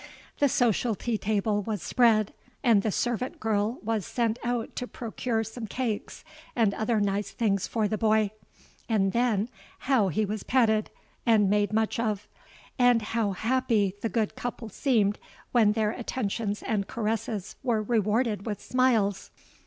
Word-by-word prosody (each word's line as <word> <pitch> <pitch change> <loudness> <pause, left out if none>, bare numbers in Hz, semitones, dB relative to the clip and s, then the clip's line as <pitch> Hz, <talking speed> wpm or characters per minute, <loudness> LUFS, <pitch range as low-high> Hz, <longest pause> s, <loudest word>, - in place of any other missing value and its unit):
The 285 - +4
social 240 -2 +2
tea 225 +1 -2
table 205 0 0
was 210 0 -4
spread, 225 -4 +3 0.3
and 230 -6 +5
the 215 - -1
servant 245 +4 -2
girl 220 +2 0
was 220 -2 -1
sent 230 +3 -1
out 240 -1 -2
to 250 - -3
procure 230 -1 -2
some 225 +1 -7
cakes 225 -1 -3 0.3
and 220 -4 +3
other 220 +1 0
nice 200 0 0
things 200 -5 0
for 220 -2 0
the 215 0 -2
boy; 215 -2 +3 0.6
and 195 -4 +2
then 235 -3 +1 0.3
how 255 -7 +3
he 200 +5 0
was 210 +1 -3
petted 220 -4 +2 0.3
and 210 -4 +4
made 205 0 +2
much 220 +1 0
of—and 230 +3 -1
how 220 -4 +1
happy 225 -3 +1
the 225 - -1
good 220 -2 -1
couple 240 -2 -5
seemed 215 -4 +1 0.3
when 220 -4 +4
their 215 -1 +1
attentions 220 -3 -3
and 205 -3 -1
caresses 220 -2 -3
were 225 -4 0
rewarded 215 -1 0
with 210 -3 -3
smiles! 230 -6 +1
220 Hz, 150 wpm, -27 LUFS, 205-235 Hz, 0.6 s, and